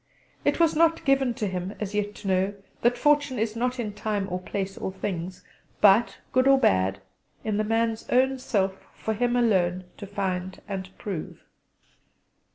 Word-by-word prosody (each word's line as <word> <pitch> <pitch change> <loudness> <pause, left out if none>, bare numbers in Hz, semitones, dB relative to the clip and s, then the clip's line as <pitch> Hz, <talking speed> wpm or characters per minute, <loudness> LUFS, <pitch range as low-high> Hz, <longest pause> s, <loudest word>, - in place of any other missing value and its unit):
It - - +1
was 330 -2 +4
not 330 +1 +3
given 270 -3 +3
to 215 - -2
him 185 0 -3
as 210 -1 -4
yet 210 0 -1
to - - -8
know 190 +1 +2 0.3
that 240 +1 +3
fortune 290 -1 +3
is 220 0 -1
not 250 +2 -1
in 215 -3 -3
time 205 -1 -2
or 180 - -1
place 195 +1 -4
or - - -4
things; 185 -2 -5 0.4
but, 210 +3 +5
good 255 +1 +3
or 275 0 +7
bad, 95 - +2 0.4
in 215 -2 -1
the 215 - +2
man's 225 +1 0
own 265 +1 +3
self 195 -6 -1
for 220 - -2
him 240 +3 +1
alone 185 -7 +2
to 200 - -8
find 190 -2 -3
and 190 -2 -4
prove. 190 -7 -6
210 Hz, 170 wpm, -26 LUFS, 190-245 Hz, 0.4 s, or